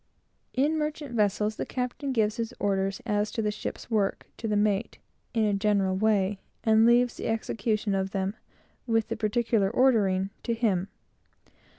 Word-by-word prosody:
In 295 Hz, +5 st, +2 dB
merchant 300 Hz, -3 st, -3 dB
vessels, 210 Hz, 0 st, +1 dB
the -, -, -2 dB
captain 255 Hz, +2 st, -3 dB
gives 220 Hz, -2 st, +1 dB
his 230 Hz, +1 st, -3 dB
orders 195 Hz, -1 st, 0 dB
as 210 Hz, 0 st, 0 dB
to 225 Hz, -, -1 dB
the 210 Hz, -, +1 dB
ship's 210 Hz, -, -6 dB
work, 205 Hz, -3 st, 0 dB
to 225 Hz, -, -4 dB
the 210 Hz, -, 0 dB
mate, 205 Hz, -1 st, +1 dB, 0.4 s
in 225 Hz, -, +3 dB
a 210 Hz, -1 st, +2 dB
general 200 Hz, -2 st, +1 dB
way, 200 Hz, -1 st, +1 dB, 0.2 s
and 220 Hz, 0 st, +5 dB
leaves 240 Hz, 0 st, +4 dB
the -, -, -4 dB
execution 220 Hz, -1 st, -1 dB
of 190 Hz, 0 st, 0 dB
them, 195 Hz, +1 st, -2 dB, 0.5 s
with 225 Hz, -2 st, +1 dB
the 225 Hz, -, -1 dB
particular 220 Hz, -2 st, +1 dB
ordering, 200 Hz, -6 st, +3 dB
to 235 Hz, -, -1 dB
him. 200 Hz, -6 st, +1 dB
215 Hz, 165 wpm, -27 LUFS, 200-230 Hz, 0.5 s, and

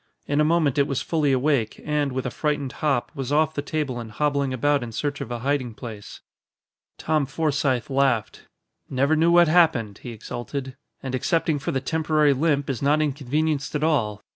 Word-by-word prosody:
In 145 Hz, +1 st, +1 dB
a -, -, +5 dB
moment 155 Hz, -3 st, +2 dB
it 140 Hz, -, +3 dB
was 135 Hz, -, -2 dB
fully 155 Hz, -4 st, +1 dB
awake 130 Hz, -3 st, +1 dB
and, 150 Hz, -2 st, 0 dB
with 130 Hz, 0 st, -3 dB
a 125 Hz, -, -2 dB
frightened 145 Hz, -2 st, -1 dB
hop, 140 Hz, -5 st, 0 dB
was 135 Hz, -1 st, -4 dB
off 155 Hz, +1 st, +2 dB
the 145 Hz, -, -2 dB
table 145 Hz, -4 st, -3 dB
and 115 Hz, -2 st, -7 dB
hobbling 140 Hz, 0 st, 0 dB
about 140 Hz, +3 st, +1 dB
in 120 Hz, -1 st, -6 dB
search 145 Hz, +6 st, -3 dB
of -, -, -5 dB
a 120 Hz, -, -3 dB
hiding 135 Hz, -5 st, -1 dB
place. 110 Hz, -5 st, -9 dB, 0.8 s
Tom 155 Hz, -3 st, 0 dB
Forsythe 140 Hz, -4 st, 0 dB
laughed. 135 Hz, -5 st, 0 dB, 0.4 s
"Never 140 Hz, +4 st, +2 dB
knew 165 Hz, +2 st, +3 dB
what 175 Hz, 0 st, +6 dB
happened," 155 Hz, -, +3 dB
he -, -, -8 dB
exulted, 130 Hz, +4 st, -6 dB, 0.3 s
"and 130 Hz, -1 st, -4 dB
excepting 155 Hz, +3 st, +1 dB
for -, -, -4 dB
the 135 Hz, -, -1 dB
temporary 155 Hz, 0 st, +2 dB
limp 145 Hz, 0 st, +1 dB
is 135 Hz, -5 st, -3 dB
not 145 Hz, +2 st, +3 dB
inconvenienced 145 Hz, 0 st, -1 dB
at 150 Hz, -, -1 dB
all. 110 Hz, -10 st, 0 dB
140 Hz, 190 wpm, -24 LUFS, 130-150 Hz, 0.8 s, what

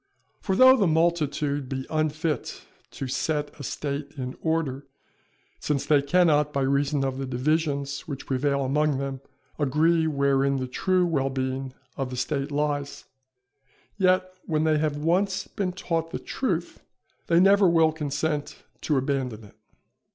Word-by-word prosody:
For 190 Hz, -, -1 dB
though 260 Hz, +4 st, +8 dB
the 205 Hz, -7 st, +2 dB
multitude 150 Hz, -4 st, 0 dB
be 130 Hz, -1 st, -4 dB
unfit 155 Hz, 0 st, -2 dB, 0.3 s
to 135 Hz, -, -6 dB
set 150 Hz, +3 st, -1 dB
a -, -, -6 dB
State 140 Hz, +1 st, -4 dB
in 130 Hz, -1 st, -5 dB
order, 150 Hz, -4 st, -1 dB, 0.7 s
since 145 Hz, -3 st, -1 dB
they 145 Hz, -2 st, +4 dB
cannot, 150 Hz, -1 st, +3 dB
by 140 Hz, -2 st, -1 dB
reason 140 Hz, +1 st, +1 dB
of 135 Hz, 0 st, -3 dB
the 135 Hz, -, -3 dB
divisions 140 Hz, +1 st, -1 dB
which 140 Hz, -3 st, -6 dB
prevail 140 Hz, +1 st, 0 dB
among 150 Hz, +1 st, +1 dB
them, 135 Hz, -1 st, -4 dB, 0.4 s
agree 160 Hz, +3 st, +2 dB
wherein 140 Hz, -2 st, +2 dB
the 130 Hz, -, -2 dB
true 180 Hz, +8 st, +1 dB
well 140 Hz, -6 st, 0 dB
being 130 Hz, 0 st, -3 dB, 0.2 s
of 135 Hz, -2 st, -2 dB
the 125 Hz, -, -6 dB
State 135 Hz, +3 st, -2 dB
lies, 145 Hz, -1 st, -2 dB, 0.9 s
yet 185 Hz, -1 st, +2 dB
when 155 Hz, -2 st, +1 dB
they 155 Hz, -1 st, +2 dB
have 150 Hz, -1 st, 0 dB
once 185 Hz, +5 st, 0 dB
been 190 Hz, -3 st, -2 dB
taught 165 Hz, -2 st, -2 dB
the -, -, -4 dB
truth, 180 Hz, -10 st, -3 dB, 0.5 s
they 170 Hz, 0 st, +4 dB
never 195 Hz, 0 st, +5 dB
will 165 Hz, -2 st, +4 dB
consent 150 Hz, 0 st, -3 dB, 0.2 s
to 150 Hz, -, +1 dB
abandon 130 Hz, -4 st, -2 dB
it. 105 Hz, -, -16 dB
145 Hz, 150 wpm, -26 LUFS, 135-165 Hz, 0.9 s, though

